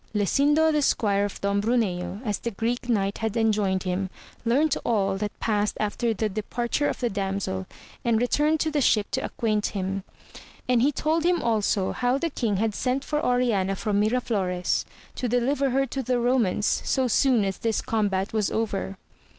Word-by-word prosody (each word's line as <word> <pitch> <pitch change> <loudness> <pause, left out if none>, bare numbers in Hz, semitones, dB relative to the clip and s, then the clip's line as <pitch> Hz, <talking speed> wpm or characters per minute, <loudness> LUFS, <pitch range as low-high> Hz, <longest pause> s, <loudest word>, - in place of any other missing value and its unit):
Lasindo 290 - +3
the 300 -1 +2
squire 205 -7 +2
of 205 - -6
Don 200 0 +1
Bruneo, 205 -4 -1
as 210 -2 -1
the 235 - -3
Greek 235 +3 -3
Knight 200 -3 0
had 220 0 -2
enjoined 210 -4 +1
him, 185 +1 -2 0.3
learnt 275 +6 +2
all 195 -4 +1
that 205 +1 -4
passed 210 -2 0
after 220 +3 0
the 220 0 0
departure 235 +7 -1
of - - -4
the 245 - 0
damsel, 195 - -2 0.4
and 230 -2 +2
returned 295 +6 +2
to 315 - 0
the 295 -1 +1
ship 210 -5 +2
to - - -1
acquaint 215 -3 -1
him, 195 +1 -2 0.7
and 245 -2 +3
he 280 +4 +4
told 315 +3 0
him 350 0 +3
also 210 -4 +1
how 250 +1 +1
the 330 +3 -2
king 220 -7 -1
had 220 +1 0
sent 255 +5 -1
for 300 0 -2
Oriana 230 -6 +1
from 205 +1 0
Miraflores, 210 -6 0 0.3
to 250 - -3
deliver 265 +4 +1
her 270 +2 +2
to 270 +1 -4
the 255 0 0
Romans, 235 -5 +1
so 260 -2 +1
soon 245 -2 +3
as 195 -1 -3
this 225 -1 0
combat 200 -3 -1
was 215 -2 +1
over. 200 -3 -2
225 Hz, 180 wpm, -25 LUFS, 200-250 Hz, 0.7 s, he